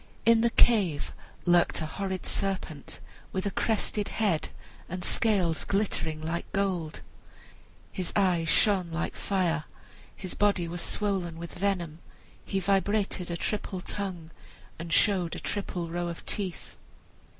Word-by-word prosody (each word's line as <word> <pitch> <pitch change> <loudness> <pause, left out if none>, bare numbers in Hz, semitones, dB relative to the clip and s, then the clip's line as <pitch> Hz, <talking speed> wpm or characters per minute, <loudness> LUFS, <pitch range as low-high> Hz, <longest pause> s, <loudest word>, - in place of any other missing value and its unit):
In 230 0 +6
the 235 - +4
cave 195 -12 +3 0.3
lurked 175 -1 +4
a 160 - -1
horrid 190 +3 -3
serpent 190 -6 -2 0.3
with 190 +1 -2
a 200 - 0
crested 210 0 0
head 200 -8 0 0.4
and 180 0 -4
scales 190 -8 +2
glittering 165 -6 0
like 165 +2 -3
gold. 185 -6 -1 0.9
His 185 -2 -3
eyes 180 -5 +3
shone 190 -3 +4
like 170 +1 -2
fire, 170 -5 0 0.5
his 185 -2 -5
body 200 -4 +2
was 175 +1 -4
swollen 190 -5 -1
with 170 0 -7
venom, 175 -4 -1 0.4
he 195 - -1
vibrated 195 -1 +1
a 170 - -2
triple 200 0 -2
tongue, 180 -5 -4 0.5
and 165 0 -5
showed 185 -3 +3
a - - -5
triple 180 -4 -3
row 175 0 -1
of 170 -1 -6
teeth. 190 -4 -2
185 Hz, 135 wpm, -29 LUFS, 170-200 Hz, 0.9 s, In